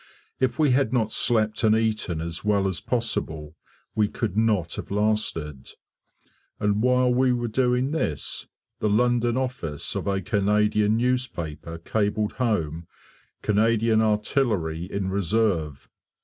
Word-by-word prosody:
If 130 -2 0
we 150 -4 +3
had 135 +2 +2
not 115 -4 +1
slept 110 -2 +1
and 110 0 +5
eaten 110 -7 -1
as 85 0 -5
well 100 -2 +2
as 95 -3 -3
possible 80 -10 -2 0.4
we 105 -1 +3
could 105 -2 -3
not 105 -6 +1
have - - -6
lasted. 100 -9 -1 0.9
And 105 0 +1
while 125 0 +3
we 130 +1 +3
were 120 -1 -1
doing 125 +3 +1
this, 80 - -2 0.3
the 105 - +1
London 120 +2 +2
office 125 - -3
of - - -3
a 100 -1 +1
Canadian 105 +2 +2
newspaper 85 - -2
cabled 105 +4 -1
home 85 -9 -1 0.6
"Canadian 110 +1 +3
Artillery 105 - 0
in 95 -1 -2
reserve." 95 -7 0
105 Hz, 130 wpm, -25 LUFS, 90-120 Hz, 0.9 s, and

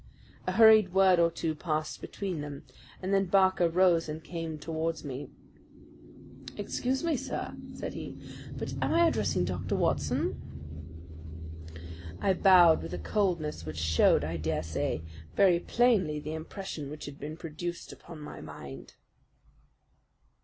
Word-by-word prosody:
A - - 0
hurried 220 -4 +7
word 190 -2 +6
or 170 0 +5
two 165 -1 -2
passed 155 0 -3
between 185 -6 -4
them, 145 -1 -7 0.4
and 190 +2 -1
then 195 0 +3
Barker 190 -2 +4
rose 170 -2 +3
and 155 +1 -6
came 165 -2 -5
towards 160 +1 -3
me. 140 -1 -6 1.3
"Excuse 255 +6 -2
me, 330 -2 +1
sir," - - -4 0.2
said - - -5
he, - - -7 0.4
"but - - -4
am - - +1
I 340 0 +6
addressing 90 - +1
Dr. 90 0 -2
Watson?" - - 0 1.8
I 195 - +2
bowed 180 -3 +6
with 80 +2 -5
a - - -4
coldness 155 - -1
which 80 0 -6
showed, 80 0 +3
I 80 +2 -3
dare 80 -1 -1
say, 80 -1 -2 0.3
very 185 -3 +5
plainly 195 -9 +2
the 150 +1 -5
impression 160 -2 -6
which 150 +1 -7
had 145 0 -9
been 155 +2 -6
produced 170 +2 -6
upon 165 - -12
my 150 - -8
mind. 70 0 -10
165 Hz, 140 wpm, -30 LUFS, 145-190 Hz, 1.8 s, hurried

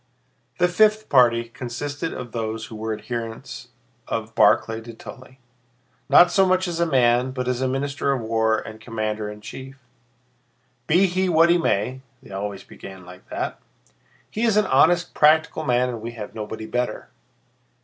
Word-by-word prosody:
The 180 - +3
fifth 215 +4 +2
party 120 -3 +4
consisted 145 +7 -5
of 125 -2 -7
those 110 -1 -4
who 110 - -10
were 110 +1 -4
adherents 115 +2 -6 0.4
of 115 0 -4
Barclay 110 0 +3
de 115 +1 -10
Tolly, 130 +3 -12 0.7
not 175 0 +7
so 195 +2 +4
much 185 0 +2
as 170 -1 -3
a 170 - +2
man 125 -3 +3
but 130 -1 -4
as 125 0 -1
minister 135 +1 -1
of 135 - 0
war 110 -1 +1
and 110 0 -8
commander 110 -1 -3
in 105 0 -10
chief. 135 +5 -9 1.1
"Be 180 +5 +4
he 185 0 0
what 165 0 +5
he 175 - +4
may" 130 -2 0 0.2
(they - - -14
always 100 0 -5
began 95 -2 -12
like 90 +1 -14
that), - - -4 0.7
"he 215 - -4
is 225 -3 +3
an 210 - +4
honest, 175 -1 +3
practical 160 +1 +3
man 125 -1 +2
and 120 -3 -5
we 115 +1 -6
have 105 -3 -8
nobody 110 0 -6
better. 125 +2 -3
125 Hz, 165 wpm, -23 LUFS, 110-160 Hz, 1.1 s, not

